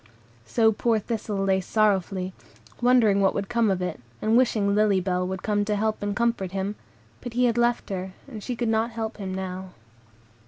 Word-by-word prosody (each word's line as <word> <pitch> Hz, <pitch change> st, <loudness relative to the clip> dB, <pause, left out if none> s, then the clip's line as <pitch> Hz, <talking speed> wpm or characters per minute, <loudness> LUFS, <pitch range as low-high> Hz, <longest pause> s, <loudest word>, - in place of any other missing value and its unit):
So 225 Hz, -2 st, +4 dB
poor 225 Hz, +1 st, +1 dB
Thistle 210 Hz, -2 st, -3 dB
lay 190 Hz, -1 st, +2 dB
sorrowfully, 190 Hz, -2 st, +1 dB, 0.5 s
wondering 235 Hz, -5 st, +4 dB
what 195 Hz, -, +3 dB
would 200 Hz, -, -2 dB
come 235 Hz, -2 st, +2 dB
of 185 Hz, -2 st, 0 dB
it, 180 Hz, -3 st, -3 dB, 0.2 s
and 220 Hz, +1 st, +2 dB
wishing 220 Hz, -5 st, +3 dB
Lily 210 Hz, -2 st, +3 dB
Bell 180 Hz, 0 st, -1 dB
would 190 Hz, 0 st, -5 dB
come 205 Hz, -1 st, +1 dB
to 210 Hz, 0 st, 0 dB
help 215 Hz, +1 st, -1 dB
and 205 Hz, 0 st, -2 dB
comfort 230 Hz, -5 st, 0 dB
him; 195 Hz, +1 st, -2 dB, 0.5 s
but 245 Hz, -, -6 dB
he 250 Hz, +1 st, +3 dB
had 235 Hz, -2 st, +2 dB
left 240 Hz, -2 st, +1 dB
her, 185 Hz, 0 st, -4 dB
and 225 Hz, -6 st, -8 dB
she 250 Hz, +3 st, -4 dB
could 235 Hz, 0 st, -1 dB
not 225 Hz, +1 st, +1 dB
help 225 Hz, -1 st, -4 dB
him 195 Hz, -2 st, -5 dB
now. 185 Hz, 0 st, -5 dB
210 Hz, 195 wpm, -25 LUFS, 190-230 Hz, 0.5 s, So